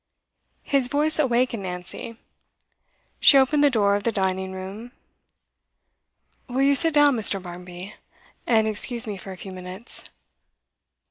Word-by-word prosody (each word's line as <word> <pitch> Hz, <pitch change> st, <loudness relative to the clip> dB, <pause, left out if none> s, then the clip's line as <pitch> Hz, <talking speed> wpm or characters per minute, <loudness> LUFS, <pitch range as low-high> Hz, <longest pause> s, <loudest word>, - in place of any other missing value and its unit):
His 275 Hz, -3 st, 0 dB
voice 300 Hz, +4 st, +1 dB
awakened 245 Hz, -5 st, 0 dB
Nancy. 180 Hz, +5 st, -7 dB, 1.0 s
She 280 Hz, -, +7 dB
opened 280 Hz, +2 st, +3 dB
the 290 Hz, -, +5 dB
door 205 Hz, -5 st, +2 dB
of 205 Hz, -, -2 dB
the 230 Hz, -, -1 dB
dining 190 Hz, -2 st, -2 dB
room. 195 Hz, +6 st, -9 dB, 1.6 s
'Will 260 Hz, +2 st, 0 dB
you 280 Hz, +1 st, +4 dB
sit 320 Hz, +2 st, +6 dB
down, 290 Hz, -2 st, +5 dB
Mr. 210 Hz, -3 st, +2 dB
Barmby, 180 Hz, +1 st, -10 dB, 0.5 s
and 220 Hz, -2 st, +2 dB
excuse 230 Hz, +2 st, 0 dB
me 210 Hz, -2 st, -5 dB
for 195 Hz, 0 st, -10 dB
a 185 Hz, -, -9 dB
few 190 Hz, -, -9 dB
minutes? 185 Hz, +5 st, -7 dB
220 Hz, 135 wpm, -23 LUFS, 190-265 Hz, 1.6 s, She